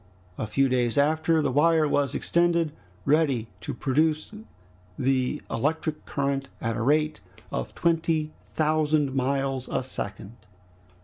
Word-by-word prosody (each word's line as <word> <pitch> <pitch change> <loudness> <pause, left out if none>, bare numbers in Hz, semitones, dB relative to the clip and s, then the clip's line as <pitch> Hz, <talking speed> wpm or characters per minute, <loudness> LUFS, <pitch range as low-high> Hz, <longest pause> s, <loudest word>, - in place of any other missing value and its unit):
A 110 - -3
few 135 +5 +2
days 125 -1 +1
after, 160 +2 +3
the 140 - +1
wire 155 +3 +4
was 145 -1 +1
extended, 170 -2 +2 0.3
ready 140 -6 +2
to 145 - -5
produce 155 - 0 0.6
the 130 +2 0
electric 155 +5 -1
current 140 -1 -1
at 115 -2 -2
a - - -2
rate 150 +4 +2 0.3
of - - -4
twenty 160 -2 +1
thousand 155 -2 +1
miles 135 -1 0
a - - -1
second. 105 -3 -6
145 Hz, 125 wpm, -26 LUFS, 130-155 Hz, 0.6 s, wire